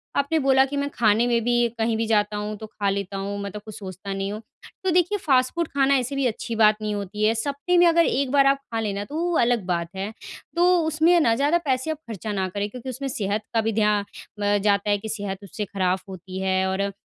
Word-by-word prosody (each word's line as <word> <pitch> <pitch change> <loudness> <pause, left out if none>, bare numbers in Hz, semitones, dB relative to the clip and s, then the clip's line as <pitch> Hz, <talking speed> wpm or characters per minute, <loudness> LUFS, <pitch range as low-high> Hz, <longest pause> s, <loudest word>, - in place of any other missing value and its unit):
आपने 280 +3 +1
बोला 265 -1 +4
कि 285 +1 -5
मैं 280 0 -1
खाने 220 +1 +3
में 235 -1 +2
भी 240 0 +1 0.2
कहीं 225 0 +1
भी 225 - 0
जाता 210 -1 +1
हूँ 210 +1 -4
तो 220 - -8
खा 205 -1 -2
लेता 195 0 -3
हूँ 200 +1 -4
मैं 200 - -5
तो 210 - -7
कुछ 215 0 -10
सोचता 190 0 -7
नहीं 195 +1 -3
हूँ, 215 +1 -6 0.4
तो 375 - +1
देखिए 360 +4 +2
फास्ट 255 -7 +2
फूड 340 -2 0
खाना 275 0 +2
ऐसे 255 +2 -2
भी 275 -1 0
अच्छी 230 0 -4
बात 215 -1 +5
नहीं 210 -1 -2
होती 205 +1 -4
है, 220 - +4
सप्तेह 285 +9 0
में 350 - +7
अगर 335 0 +4
एक 270 0 0
बार 280 -1 +5
आप 275 0 +4 0.2
खा 225 - 0
ले 210 -3 -2
ना, 200 +1 -3
तो 290 - -9
वो 345 -1 0
अलग 235 -4 +2
बात 170 -2 -1
है, 195 +3 -4 0.4
तो 355 +1 +4
उसमें 320 +3 +4
ना 230 -7 +3
ज़्यादा 290 +6 +2
पैसे 260 +3 0
आप 310 - -4
खर्चा 215 -1 -5
ना 190 -2 -1
करें 205 +2 -3
क्योंकि 250 +3 -8
उसमें 270 +2 -4
सेहत 205 -2 -1
का 225 - +3
भी 225 0 -1
ध्या 210 -1 +3
अ, 205 0 -3
जाता 200 0 +1
है 205 - +3
कि 220 +2 -7
सेहत 200 -2 -4
उससे 205 +2 -5
खराब 185 -1 0
होती 185 0 -7
है 190 0 +1
और 190 +1 -1
अ, 200 0 -1
220 Hz, 255 wpm, -24 LUFS, 200-275 Hz, 0.4 s, में